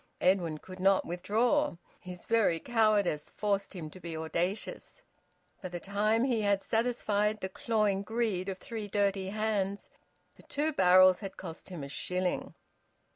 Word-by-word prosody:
Edwin 180 -4 +2
could 185 +4 -11
not 195 +1 +3
withdraw. 230 - +1 0.2
His 180 -1 -9
very 220 -8 +2
cowardice 215 -9 +1
forced 200 -1 -2
him 155 -4 -6
to 185 - -12
be 170 -2 -6
audacious. 175 - -3 0.6
By 185 - -5
the 175 0 -5
time 210 +4 +1
he 245 -4 +1
had 200 -1 +1
satisfied 215 -2 0
the 190 - -4
clawing 210 -1 0
greed 210 -3 -1
of 190 - -4
three 220 +1 -6
dirty 200 -2 0
hands, 205 -2 -2 0.5
the - - -15
two 305 +2 0
barrels 185 -3 +6
had 195 -2 -7
cost 165 -1 -8
him 175 -6 -6
a - - -5
shilling. 180 +5 -2
195 Hz, 150 wpm, -31 LUFS, 180-215 Hz, 0.6 s, barrels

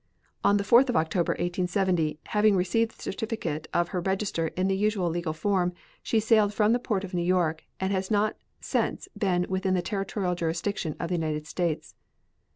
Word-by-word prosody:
On 205 - +5
the 200 - 0
4th 240 +6 +5
of 245 - 0
October, 165 +2 +1
1870, 175 -3 0
having 210 -1 +4
received 205 +5 +1
the - - -12
certificate 190 -8 -3
of 175 0 +1
her 180 -3 -2
register 190 -3 -1
in 185 +1 +2
the 195 - +1
usual 200 -3 +1
legal 170 -1 -2
form, 180 +2 0 0.3
she 225 - +1
sailed 215 -2 +3
from 215 +2 +4
the 245 - +2
port 210 -5 -1
of 190 -1 -7
New 175 - 0
York 170 -3 +1
and 190 +1 0
has 190 0 -1
not 210 0 +2 0.2
since - - -1
been 185 -4 +1
within 190 0 0
the 180 - 0
territorial 195 -2 -2
jurisdiction 170 0 -2
of 170 - -3
the 180 - 0
United 155 -2 -2
States. 165 0 -2
185 Hz, 185 wpm, -27 LUFS, 175-205 Hz, 0.3 s, On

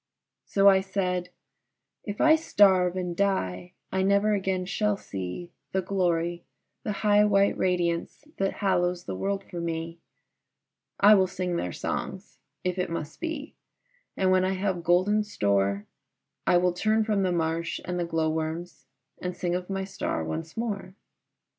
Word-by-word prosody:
So 200 0 +3
I 190 -1 +7
said, 180 -2 -2 0.8
"If 205 -1 -5
I 315 0 +6
starve 190 - +4
and 180 -2 -3
die 95 - -1 0.2
I 190 - +1
never 200 +2 +3
again 190 -2 -1
shall 210 +2 0
see 95 - -6 0.2
The 190 0 +1
glory, 175 -3 0 0.4
the 215 - -3
high 205 0 +6
white 200 -1 +3
radiance 175 +3 -1
that 195 0 +1
hallows 180 -2 +1
the 95 - -5
world 195 - -2
for 175 -3 -7
me; 165 0 -4 1.0
I 205 +2 +8
will 190 -2 +5
sing 180 -1 -3
their 90 - -2
songs, - - -5 0.2
if 180 0 -1
it 180 - -1
must 165 -3 -5
be, 320 -3 -4 0.6
and 185 -1 +3
when 185 0 +4
I 190 +1 +1
have 190 -2 -1
golden 185 +5 +3
store, 100 - 0 0.6
I 175 - +5
will 180 0 +2
turn 215 +4 +2
from 210 -3 +1
the 185 -1 +1
marsh 165 -1 -1
and 180 0 -2
the 175 - 0
glow 160 -1 0
worms, 160 -2 -4 0.3
and 180 0 -4
sing 175 -1 -1
of 180 +1 -3
my 195 0 -2
star 190 - -3
once 160 - -5
more." 200 -5 -3
180 Hz, 160 wpm, -27 LUFS, 170-195 Hz, 1.0 s, I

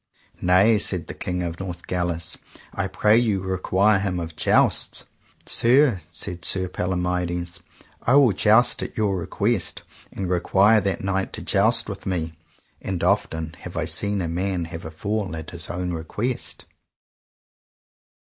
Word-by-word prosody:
Nay, 95 +5 +4
said 90 -5 -1
the - - -7
King 90 0 -3
of 85 0 -5
Northgalis, 90 -2 -3 0.3
I - - -1
pray 105 +1 +3
you 105 -5 0
require 95 +2 +2
him 95 -3 -2
of 80 -2 -6
jousts. - - +2 0.4
Sir, 120 -4 +4
said 85 -1 -5
Sir 95 +1 +3
Palomides, 90 -1 -2 0.4
I 125 - +3
will 140 -5 +6
joust 110 +5 +3
at - - -6
your 105 -3 +1
request, 100 +3 -1 0.3
and 95 - -4
require 95 +4 +3
that 95 -2 -2
knight 95 0 -1
to - - -5
joust 110 +3 +3
with 100 -2 -7
me, 85 -3 -2 0.5
and 90 -3 -3
often 80 -4 0
I - - -17
have 85 -2 -3
seen 100 -2 +1
a - - -2
man 90 +1 -2
have 80 0 -8
a - - -5
fall 100 +2 -3
at 80 -1 -7
his 85 -1 -6
own 90 0 -3
request. 105 +10 -4
95 Hz, 145 wpm, -23 LUFS, 85-105 Hz, 0.5 s, will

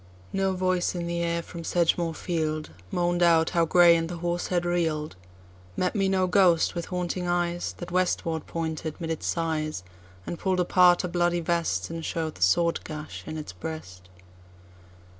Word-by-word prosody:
No 195 0 +1
voice 185 -1 0
in 175 -1 -3
the 170 0 -2
air, 170 0 -1
from 170 -1 -8
Sedgemoor 170 -1 +1
field, 155 - -2 0.2
Moan'd 175 - 0
out 165 -2 +4
how 170 -2 +3
Grey 170 +1 +6
and 165 0 -1
the 175 - -5
horse 175 +1 -2
had 175 -1 0
reel'd; 160 - -1 0.6
Met 180 - +1
me 195 -2 +1
no 190 -1 +2
ghost, 180 -3 +4
with 170 -1 -4
haunting 180 0 -3
eyes, 175 0 -1
That 175 0 -7
westward 170 -3 0
pointed 160 -1 -4
'mid 165 -2 -3
its 160 - -3
sighs, 155 - -1 0.4
And 170 - -5
pull'd 185 -1 0
apart 180 0 +5
a - - -1
bloody 175 0 +1
vest, 170 0 -1
And 165 0 -5
show'd 160 -2 -2
the - - -16
sword 170 - +3
gash 155 0 -7
in 155 - -5
its 150 -11 -7
breast. 90 - -8
170 Hz, 175 wpm, -26 LUFS, 160-175 Hz, 0.6 s, Grey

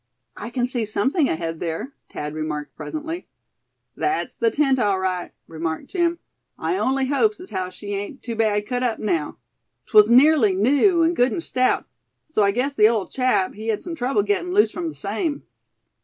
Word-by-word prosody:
"I 230 - -7
can 245 0 0
see 245 -2 -2
something 265 - +1
ahead 165 0 -3
there," 170 - -4 0.2
Thad 150 0 -5
remarked, 150 -2 -4
presently. 320 +3 -6 0.7
"That's 380 +1 -1
the 460 - +2
tent, 275 -9 +2
all 205 -4 +2
right," 185 -1 -2
remarked 160 0 -4
Jim. 345 -2 +1 0.4
"I 375 - -1
only 265 -5 +1
hopes 420 +11 +1
as 365 - -11
how 185 -2 -2
she 205 +2 -7
ain't 205 +7 -5
too 235 -2 -4
bad 210 -2 +1
cut 250 +2 -2
up 245 -3 0
now. 165 -8 -2 0.5
'Twas 210 0 +6
nearly 255 -5 +5
new, 285 - +4
and 335 +2 +2
good, 250 -3 +3
and 335 - -3
stout; 255 0 +1 0.4
so 310 -8 0
I 200 - +4
guess 250 +7 0
the 215 -4 +6
ole 220 -5 0
chap 255 -7 +1
he 215 +2 -8
had 220 -2 -1
some 345 - -5
trouble 245 -8 0
gettin' 280 - -1
loose 420 - +5
from 340 -1 -3
the - - -9
same." 225 - -3
240 Hz, 185 wpm, -23 LUFS, 200-300 Hz, 0.7 s, Twas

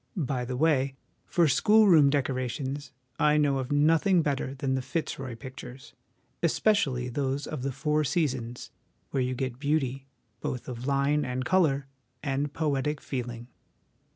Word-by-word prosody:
By 130 -6 -1
the 125 0 -4
way, 140 -3 +2 0.3
for 170 -2 +3
school 215 +9 +5
room 155 -7 +7
decorations, 135 0 -2 0.3
I 150 0 +4
know 145 -2 +2
of 130 0 -4
nothing 165 +5 +4
better 140 -2 -2
than 135 0 -1
the 130 - 0
Fitzroy 130 -2 -4
Pictures, 130 +1 -10 0.5
1 170 - +3
especially 145 - +1
those 135 +2 -2
of 155 -4 -5
the 135 +1 -2
Four 150 +4 0
Seasons, 130 -6 -2 0.4
where 135 - 0
you 125 0 -1
get 130 -1 -3
beauty, 135 -2 -1 0.3
both 125 - -4
of 125 +1 -6
line 140 +2 +2
and 125 0 -3
colour, 155 -7 +2 0.4
and 140 0 -1
poetic 150 -1 -1
feeling. 120 -2 -5
135 Hz, 150 wpm, -28 LUFS, 130-150 Hz, 0.5 s, room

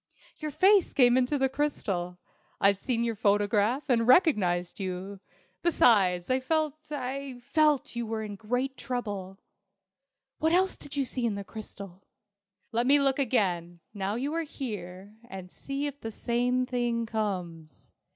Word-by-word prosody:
"Your 310 - -4
face 385 +5 +4
came 245 -3 +5
into 260 +3 +2
the 265 -1 +2
crystal. 200 -11 -2 0.4
I'd 200 0 +4
seen 235 0 -1
your 230 -1 0
photograph, 205 +5 +2
and 235 -4 +2
recognized 200 - +3
you. 190 +1 -5 0.4
Besides, 195 - +3
I 255 - +3
felt 310 +2 0 0.2
I 270 -2 -4
felt 300 0 +3
that - - -9
you 235 -1 -3
were 220 0 -3
in 210 -1 -6
great 250 +6 -2
trouble." 205 -7 -4 1.0
"What 320 +1 +2
else 375 +1 +3
did 290 - -10
you 275 - +1
see 250 -1 -1
in 215 - -1
the 200 - -5
crystal?" 200 -3 -9 0.7
"Let 235 +2 +1
me 285 +2 +6
look 275 0 +2
again, 180 -9 0
now 200 0 -2
you 275 +6 -2
are 330 - 0
here, 205 - -7
and 185 -1 -8
see 275 +1 -4
if 285 0 -6
the 225 - -4
same 245 +3 0
thing 240 -2 -1
comes." 180 - -5
235 Hz, 155 wpm, -28 LUFS, 200-270 Hz, 1.0 s, me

